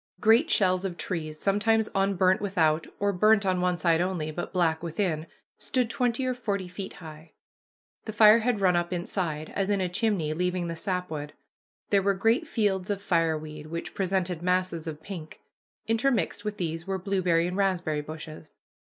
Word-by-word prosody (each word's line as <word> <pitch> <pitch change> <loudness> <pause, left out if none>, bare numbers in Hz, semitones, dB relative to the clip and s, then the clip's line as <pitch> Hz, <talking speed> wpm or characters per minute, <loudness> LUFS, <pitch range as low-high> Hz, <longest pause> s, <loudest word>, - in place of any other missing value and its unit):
Great 230 - +4
shells 185 - +3
of 180 -3 -4
trees, 155 -4 -4
sometimes 215 +2 +2
unburnt 195 -1 +2
without, 165 -6 +1
or 205 0 +1
burnt 215 +2 +4
on 185 -1 +1
one 180 -1 +1
side 165 0 +2
only, 175 -4 -2
but 175 +3 -5
black 165 -3 +1
within, 165 -1 -2 0.3
stood 250 -3 -1
twenty 245 +1 0
or 255 - 0
forty 200 -6 -3
feet 190 +2 -7
high. 160 -1 -12 0.7
The 220 - -4
fire 215 +1 +7
had 230 -2 0
run 180 -2 +4
up 175 0 0
inside, 170 -3 -3
as 195 0 0
in 200 -1 +2
a 185 - 0
chimney, 180 -5 0
leaving 180 +1 -1
the 170 0 -4
sapwood. 160 -5 -3 0.6
There 200 -1 +4
were 200 0 +1
great 225 - +2
fields 200 - 0
of 200 -1 -1
fireweed, 155 -5 -1
which 170 +1 -5
presented 185 -3 -1
masses 180 -2 0
of 155 -1 -6
pink. 170 -5 -8 0.5
Intermixed 225 -2 0
with 210 -1 -4
these 165 -2 -3
were 195 0 -1
blueberry 180 -3 +1
and 180 +1 -3
raspberry 180 -6 0
bushes. 155 0 -10
185 Hz, 170 wpm, -27 LUFS, 165-205 Hz, 0.7 s, fire